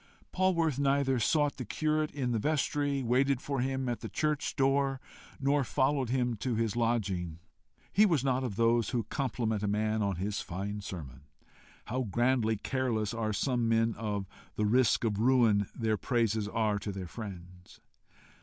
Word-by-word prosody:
Polwarth 170 Hz, -7 st, +1 dB
neither 140 Hz, -2 st, +2 dB
sought 145 Hz, +6 st, +2 dB
the 130 Hz, -, -4 dB
curate 155 Hz, +8 st, 0 dB
in 130 Hz, -4 st, -2 dB
the 115 Hz, -, 0 dB
vestry, 145 Hz, 0 st, 0 dB
waited 130 Hz, +2 st, +2 dB
for 140 Hz, -2 st, -2 dB
him 130 Hz, 0 st, -1 dB
at 120 Hz, -1 st, -2 dB
the -, -, -6 dB
church 150 Hz, -2 st, -1 dB
door, 135 Hz, -1 st, +2 dB, 0.4 s
nor 140 Hz, +1 st, +2 dB
followed 130 Hz, 0 st, +1 dB
him 125 Hz, -1 st, 0 dB
to 120 Hz, +3 st, -2 dB
his 115 Hz, -1 st, 0 dB
lodging. 100 Hz, -8 st, -1 dB, 0.6 s
He 210 Hz, +2 st, +6 dB
was 160 Hz, -8 st, +1 dB
not 130 Hz, -1 st, +1 dB
of 120 Hz, -6 st, -3 dB
those 115 Hz, +1 st, +2 dB
who 120 Hz, -3 st, -1 dB
compliment 110 Hz, -2 st, -2 dB
a 105 Hz, -, -1 dB
man 110 Hz, +1 st, 0 dB
on 100 Hz, -2 st, 0 dB
his 100 Hz, +3 st, -2 dB
fine 100 Hz, +4 st, -5 dB
sermon. 70 Hz, -9 st, -8 dB, 0.6 s
How 130 Hz, +3 st, -2 dB
grandly 120 Hz, 0 st, +1 dB
careless 120 Hz, -4 st, -1 dB
are 115 Hz, -2 st, -1 dB
some 120 Hz, +2 st, 0 dB
men 115 Hz, 0 st, +2 dB
of 105 Hz, -3 st, -3 dB, 0.3 s
the 105 Hz, -, 0 dB
risk 120 Hz, +4 st, +3 dB
of 105 Hz, -3 st, 0 dB
ruin 115 Hz, -5 st, +4 dB
their 110 Hz, -2 st, 0 dB
praises 110 Hz, -3 st, 0 dB
are 105 Hz, -1 st, 0 dB
to 100 Hz, -, -4 dB
their 95 Hz, -1 st, -5 dB
friends! 90 Hz, -3 st, -10 dB
120 Hz, 165 wpm, -31 LUFS, 105-135 Hz, 0.6 s, He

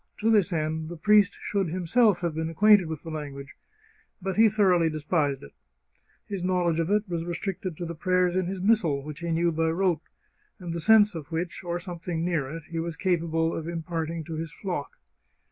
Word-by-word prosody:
To 225 Hz, +2 st, +1 dB
this 200 Hz, -4 st, +3 dB
end 160 Hz, -1 st, -2 dB
the 175 Hz, -, -7 dB
priest 205 Hz, +3 st, +4 dB
should 195 Hz, -4 st, -1 dB
him 180 Hz, +2 st, -3 dB
self 210 Hz, 0 st, +3 dB
have 170 Hz, -2 st, -1 dB
been 160 Hz, +1 st, -2 dB
acquainted 205 Hz, +1 st, +5 dB
with 160 Hz, -2 st, -6 dB
the 165 Hz, -, -7 dB
language. 140 Hz, -3 st, -7 dB, 0.6 s
But 190 Hz, 0 st, -3 dB
he 220 Hz, +1 st, +6 dB
thor 205 Hz, -2 st, +3 dB
oughly 165 Hz, -2 st, +2 dB
despised 150 Hz, -2 st, -1 dB
it. 70 Hz, -, -12 dB, 0.7 s
His 195 Hz, -3 st, -5 dB
knowledge 180 Hz, -3 st, +1 dB
of 165 Hz, +1 st, 0 dB
it 210 Hz, +1 st, +1 dB
was 170 Hz, -2 st, -3 dB
restricted 175 Hz, 0 st, -4 dB
to 175 Hz, -, -4 dB
the 170 Hz, -, -5 dB
prayers 180 Hz, +2 st, +1 dB
in 185 Hz, -1 st, 0 dB
his 190 Hz, +1 st, -4 dB
missal, 180 Hz, -10 st, +2 dB
which 150 Hz, +1 st, -8 dB
he 170 Hz, 0 st, -4 dB
knew 170 Hz, +1 st, +2 dB
by 160 Hz, 0 st, 0 dB
rote, 170 Hz, -2 st, +1 dB, 0.6 s
and 175 Hz, -4 st, -6 dB
the 170 Hz, -, -3 dB
sense 210 Hz, +4 st, +5 dB
of 160 Hz, -2 st, -8 dB
which, 170 Hz, +3 st, -3 dB
or 175 Hz, -1 st, -2 dB
something 170 Hz, -1 st, -4 dB
near 160 Hz, -7 st, -1 dB
it, 165 Hz, +2 st, -7 dB
he 165 Hz, +1 st, -5 dB
was 165 Hz, -1 st, -4 dB
capable 165 Hz, -3 st, 0 dB
of 165 Hz, +1 st, -4 dB
im 165 Hz, -1 st, -4 dB
parting 165 Hz, 0 st, -3 dB
to 160 Hz, +2 st, -7 dB
his 160 Hz, 0 st, -4 dB
flock. 175 Hz, -3 st, -5 dB
170 Hz, 215 wpm, -27 LUFS, 160-185 Hz, 0.7 s, he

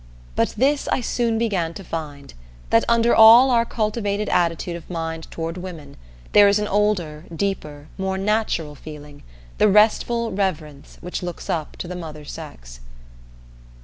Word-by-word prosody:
But -, -, 0 dB
this 280 Hz, +5 st, +1 dB
I -, -, +1 dB
soon 230 Hz, -1 st, 0 dB
began 190 Hz, -8 st, -1 dB
to 195 Hz, -, -8 dB
find: 150 Hz, -5 st, -7 dB, 0.4 s
that 115 Hz, -, +5 dB
under 235 Hz, 0 st, +3 dB
all 230 Hz, +4 st, +8 dB
our 235 Hz, -1 st, +3 dB
cultivated 210 Hz, -2 st, -2 dB
attitude 170 Hz, 0 st, 0 dB
of 170 Hz, -, -10 dB
mind 165 Hz, -2 st, -5 dB
toward 165 Hz, +1 st, -5 dB
women, 170 Hz, -6 st, -9 dB, 0.4 s
there 205 Hz, -1 st, +7 dB
is 200 Hz, +1 st, +4 dB
an 210 Hz, 0 st, -1 dB
older, 185 Hz, -7 st, 0 dB
deeper, 155 Hz, -6 st, -4 dB
more 190 Hz, 0 st, -1 dB
"natural" 195 Hz, -6 st, -1 dB
feeling, 145 Hz, -1 st, -11 dB, 0.4 s
the 215 Hz, -, +5 dB
restful 225 Hz, +3 st, +3 dB
reverence 155 Hz, -7 st, -4 dB
which 180 Hz, +2 st, -5 dB
looks 175 Hz, -1 st, -5 dB
up 155 Hz, -3 st, -4 dB
to -, -, -6 dB
the 180 Hz, -, -6 dB
Mother 155 Hz, -4 st, -8 dB
sex. -, -, -10 dB
180 Hz, 150 wpm, -22 LUFS, 155-210 Hz, 0.4 s, all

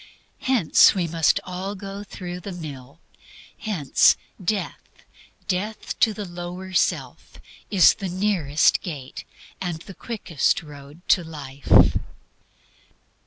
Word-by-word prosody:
Hence 245 Hz, -11 st, +5 dB
we 180 Hz, -3 st, 0 dB
must 165 Hz, -1 st, +2 dB
all 185 Hz, +2 st, -5 dB
go 195 Hz, +1 st, -7 dB
through 180 Hz, -3 st, -7 dB
the 195 Hz, +2 st, -7 dB
mill. 145 Hz, -4 st, -9 dB, 0.6 s
Hence 175 Hz, -, +3 dB, 0.3 s
death, 200 Hz, +2 st, -2 dB, 0.7 s
death 210 Hz, +3 st, -3 dB
to 225 Hz, -, +4 dB
the 210 Hz, -1 st, -6 dB
lower 180 Hz, +1 st, -7 dB
self, 175 Hz, -, -1 dB, 0.3 s
is 195 Hz, -4 st, +6 dB
the 195 Hz, -3 st, -5 dB
nearest 180 Hz, -6 st, +2 dB
gate 145 Hz, -8 st, -7 dB, 0.4 s
and 175 Hz, -3 st, -4 dB
the 195 Hz, -, -10 dB
quickest 190 Hz, -, -1 dB
road 145 Hz, +2 st, -13 dB
to 180 Hz, -, +5 dB
life. 140 Hz, -4 st, +2 dB
180 Hz, 115 wpm, -23 LUFS, 155-195 Hz, 0.7 s, is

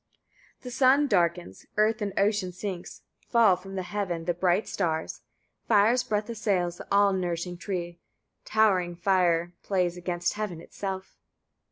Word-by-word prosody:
56. -, -, -31 dB
The 250 Hz, -, -7 dB
sun 270 Hz, +3 st, +4 dB
darkens, 170 Hz, -, 0 dB
earth 215 Hz, +1 st, +2 dB
in 205 Hz, -1 st, -1 dB
ocean 200 Hz, -2 st, +1 dB
sinks, 180 Hz, -1 st, -6 dB, 0.2 s
fall 230 Hz, -6 st, +5 dB
from 195 Hz, +2 st, -9 dB
heaven 180 Hz, -3 st, -3 dB
the 175 Hz, -, +1 dB
bright 180 Hz, +3 st, +1 dB
stars, 160 Hz, -4 st, -2 dB, 0.5 s
fire's 225 Hz, +3 st, +4 dB
breath 210 Hz, 0 st, -1 dB
assails 195 Hz, -7 st, -1 dB
the -, -, -10 dB
all 200 Hz, 0 st, +4 dB
nourishing 175 Hz, -1 st, -2 dB
tree, 175 Hz, -2 st, -4 dB, 0.4 s
towering 190 Hz, -5 st, +2 dB
fire 175 Hz, -2 st, +2 dB
plays 180 Hz, -3 st, 0 dB
against 175 Hz, 0 st, -2 dB
heaven 205 Hz, -6 st, -4 dB
itself. 190 Hz, +2 st, -6 dB
190 Hz, 140 wpm, -27 LUFS, 175-210 Hz, 0.5 s, fall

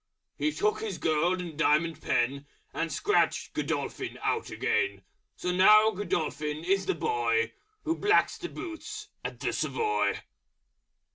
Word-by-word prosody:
He 305 Hz, -, 0 dB
took 425 Hz, +6 st, 0 dB
his 440 Hz, -, -3 dB
Gold 165 Hz, +4 st, +1 dB
and 170 Hz, -3 st, -7 dB
Diamond 165 Hz, +1 st, +2 dB
Pen 140 Hz, +4 st, 0 dB, 0.3 s
And 165 Hz, -1 st, -2 dB
Scratched 415 Hz, -, +1 dB
Godolphin -, -, -3 dB
out 445 Hz, -, 0 dB
again. 385 Hz, -, 0 dB, 0.3 s
So 180 Hz, -, -2 dB
now 215 Hz, +4 st, +7 dB
Godolphin 155 Hz, -6 st, -2 dB
is 195 Hz, +2 st, +1 dB
the 385 Hz, -, +1 dB
Boy 445 Hz, +1 st, +1 dB, 0.3 s
Who 325 Hz, +1 st, 0 dB
blacks 415 Hz, +2 st, +3 dB
the 350 Hz, -2 st, -5 dB
Boots 420 Hz, +5 st, -7 dB
at -, -, -5 dB
the -, -, -1 dB
Savoy. 435 Hz, -1 st, 0 dB
215 Hz, 135 wpm, -29 LUFS, -, 0.3 s, now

